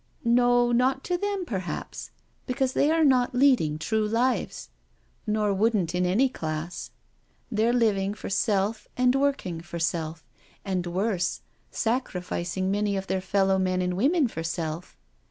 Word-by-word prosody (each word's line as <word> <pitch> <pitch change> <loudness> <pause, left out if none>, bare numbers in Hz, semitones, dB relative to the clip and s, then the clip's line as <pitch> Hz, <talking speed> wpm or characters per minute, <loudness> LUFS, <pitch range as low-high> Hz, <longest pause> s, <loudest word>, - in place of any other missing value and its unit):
" - - -32
No, 245 0 +4
not 260 +3 +2
to 360 - -1
them 400 0 -2
perhaps, 190 - -5 0.4
because 260 0 0
they 290 - +3
are 320 0 +3
not 250 -3 +3
leading 245 - +3
true 215 +6 0
lives, 240 +4 -1 0.6
nor 210 -1 +1
wouldn't 200 -4 +1
in 180 0 +1
any 220 +10 +3
class 160 -7 -5 0.3
— - - -40
they're 220 +1 +2
living 210 -5 +1
for - - -7
self 200 +1 0
and 250 0 +4
working 270 -12 0
for 170 0 -7
self, 165 -1 -2 0.4
and 185 -3 -1
worse, 185 0 -1 0.3
sacrific 180 -7 -2
ing 190 0 0
many 205 0 0
of 190 - -3
their 190 -1 -1
fellow 190 0 +2
men 185 -1 +1
and 180 0 -1
women 280 - +3
for 165 -8 -6
self. 165 +1 -4
205 Hz, 155 wpm, -26 LUFS, 180-250 Hz, 0.6 s, No